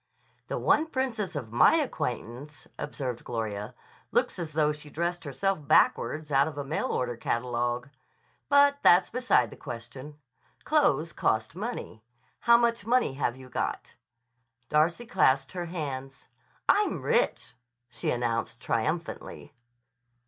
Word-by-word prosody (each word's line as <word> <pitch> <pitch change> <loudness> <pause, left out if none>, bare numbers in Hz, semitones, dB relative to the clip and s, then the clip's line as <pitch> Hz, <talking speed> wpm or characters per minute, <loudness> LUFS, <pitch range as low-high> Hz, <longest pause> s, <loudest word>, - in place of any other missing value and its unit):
"The - - -3
one 315 +2 +3
princess 245 - -2
of 125 -7 -5
my 120 - +6
acquaintance," 145 - -3
observed 130 -5 -4
Gloria, 110 0 -4 0.4
"looks - - +1
as 160 -3 -5
though 150 -1 +2
she 150 0 -10
dressed 170 +3 -2
herself 150 +3 -1
backwards 150 +5 +3
out 140 +1 +4
of 150 -2 -7
a 145 - -2
mail 150 +3 -2
order 125 -1 -1
catalogue. 120 +2 -1 0.6
But 285 0 +5
that's 180 +1 +5
beside 245 - +2
the - - -11
question. 130 +5 -8 0.5
Clothes 165 - +2
cost 110 +7 0
money. 205 - -5 0.4
How 235 0 +6
much 235 -2 +1
money 240 - +2
have 135 -3 -1
you 130 -1 -12
got?" - - -3 0.8
Darcy 165 +9 +2
clasped 135 - +2
her 180 -2 -4
hands. 135 -6 -6 0.4
"I'm 415 +1 +2
rich," 475 +1 +1 0.3
she 115 -2 -4
announced 115 -1 -1
triumphantly. 155 +10 -3
150 Hz, 130 wpm, -28 LUFS, 125-195 Hz, 0.8 s, my